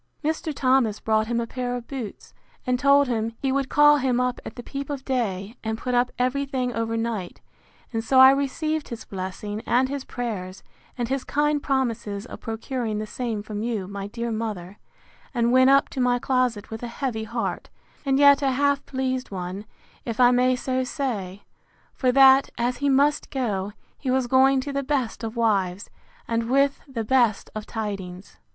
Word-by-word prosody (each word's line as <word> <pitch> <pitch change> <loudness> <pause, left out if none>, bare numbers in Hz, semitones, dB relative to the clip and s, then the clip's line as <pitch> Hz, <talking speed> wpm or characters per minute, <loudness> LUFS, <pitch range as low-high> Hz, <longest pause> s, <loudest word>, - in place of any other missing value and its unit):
Mr. 315 +1 -1
Thomas 255 -6 +2
brought 220 0 +1
him 235 0 0
a 235 - -1
pair 245 +1 -3
of 245 -1 -7
boots, 255 -7 -7 0.3
and 250 -1 +1
told 280 +1 +5
him, 230 -2 -1
He 270 - 0
would 275 0 0
call 295 0 +6
him 255 -3 +1
up 250 0 -1
at 240 +2 -9
peep 275 0 -5
of 280 -2 -5
day, 220 -5 -2
and 220 0 -2
put 250 +2 -3
up 245 0 +2
every 255 +3 +1
thing 255 -3 -2
over 230 0 -2
night; 225 -6 -3 0.5
and 225 0 -1
so 260 +3 +3
I 260 0 +10
received 295 +3 -1
his 230 -3 -7
blessing, 200 +2 -5
and 255 +2 +3
his 280 -1 -4
prayers, 205 -9 -5 0.3
and 240 -1 -1
his 270 +1 -2
kind 295 0 +1
promises 230 -7 -1
of - - -9
procuring 225 0 -3
the 215 - -3
same 225 -2 -4
from 210 -1 -5
you, 220 -5 -2
my 200 0 -5
dear 235 +2 -4
mother; 210 -4 -4 0.6
and 235 0 +2
went 260 +1 +6
up 275 0 +5
to 260 - -3
my 245 0 +3
closet 245 -5 0
with 220 - -6
a 240 - -4
heavy 235 -2 -3
heart, 230 +2 -3 0.3
and 270 -2 +2
yet 285 0 +6
a 270 -2 +2
half 280 +1 +1
pleased 260 -1 -2
one, 185 +1 -5 0.4
if 230 -1 -5
I 245 -1 +7
may 250 +1 +3
so 255 +1 -1
say; 215 -9 -4 0.5
for 255 -2 +1
that, 270 +1 +6
as 245 +1 0
he 285 +1 0
must 285 +2 +2
go, 210 -7 -2 0.3
he 270 - -3
was 260 0 +2
going 265 +2 +4
to 280 +1 -5
the 280 - 0
best 260 -5 -2
of 225 +1 -4
wives, 200 -4 0 0.4
and 230 0 -1
with 275 +2 +2
the 245 -5 -4
best 235 -3 +2
of 215 -1 -6
tidings. 195 -4 -6
245 Hz, 190 wpm, -24 LUFS, 220-270 Hz, 0.6 s, I